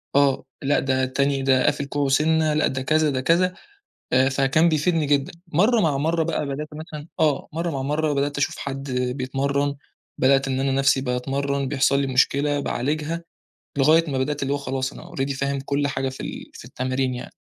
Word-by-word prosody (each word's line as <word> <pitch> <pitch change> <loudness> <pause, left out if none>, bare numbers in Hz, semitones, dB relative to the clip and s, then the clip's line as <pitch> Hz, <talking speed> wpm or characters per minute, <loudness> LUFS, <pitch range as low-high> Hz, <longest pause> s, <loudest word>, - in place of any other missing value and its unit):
آه، 140 -1 +3 0.2
لأ 145 +1 +2
ده 130 -1 0
التاني 135 +1 0
ده 130 -1 +3
قافل 140 - +1
كوعُه 140 0 -1
سِنّة، 155 +2 +3
لأ 155 - +2
ده 130 - -3
كذا 155 +3 +2
ده 130 -2 -1
كذا 175 +6 +2 0.6
آآ، 130 +1 +4
فكان 140 +5 +3
بيفيدني 160 0 +1
جدًا، 140 -1 +1 0.2
مرّه 210 +9 +3
مع 150 -6 +1
مرّه 160 +3 +1
بقى، 160 -2 -2
بدأت 140 +2 -4
مثلًا 155 -1 -8
آه، 150 -4 +1
مرّه 170 +2 -2
مع 135 -3 -3
مرّه 150 +2 0
بدأت 140 +1 -1
أشوف 145 - 0
حد 135 0 -5
بيتمرّن، 135 +3 -1 0.4
بدأت 135 +1 +3
إن 130 -1 -1
أنا 135 0 +1
نَفسي 135 0 +3
باتمَرّن 135 +2 -1
بيحصل 140 0 +2
لي 135 - -1
مشكلة، 140 +2 +2
باعالجها، 150 +6 -2 0.6
لغاية 155 +3 +4
ما 135 - -1
بدأت 145 +2 -2
اللي 135 +1 0
هو - - +1
خلاص 135 -1 -3
أنا 170 - -12
already 135 -1 -1
فاهم 140 0 -1
كُلّ 140 +1 -1
حاجة 135 -1 -2
في 130 - -8
ال - - -7
في - - -11
التمرين 130 0 -2
يعني. 125 - -8
140 Hz, 190 wpm, -23 LUFS, 135-150 Hz, 0.6 s, آآ